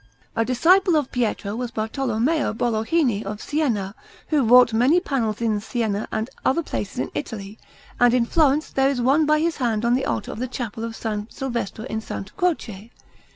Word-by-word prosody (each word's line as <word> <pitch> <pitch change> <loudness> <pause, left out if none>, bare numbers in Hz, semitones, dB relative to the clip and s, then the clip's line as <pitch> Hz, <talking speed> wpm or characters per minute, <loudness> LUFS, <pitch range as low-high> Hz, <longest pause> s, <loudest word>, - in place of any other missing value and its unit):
A 225 - +2
disciple 340 - +4
of 295 -4 0
Pietro 220 -4 -1
was 245 +1 -3
Bartolommeo 240 +5 -1
Bologhini 230 +1 +1
of 205 +1 -5
Siena, 230 -11 -1 0.4
who 305 -3 +3
wrought 245 0 +6
many 255 +10 +4
panels 235 - -2
in 220 -3 +1
Siena 220 -2 -2
and 220 +1 -2 0.2
other 335 +6 +2
places 205 -8 -5
in - - -2
Italy, 210 -6 -6 0.4
and 245 0 +6
in 245 -1 +2
Florence 300 +2 +2
there 270 0 +2
is 275 -3 -1
one 280 +5 +3
by 305 0 +4
his 330 +1 0
hand 235 -4 0
on 235 - +3
the 260 +2 +1
altar - - -2
of - - -7
the 255 - -2
Chapel 230 -3 -5
of 230 0 -4
S. 210 -2 -3
Silvestro 235 -5 -4
in 220 - -4
S. 195 - -6
Croce. 235 - -2
240 Hz, 185 wpm, -23 LUFS, 220-280 Hz, 0.4 s, wrought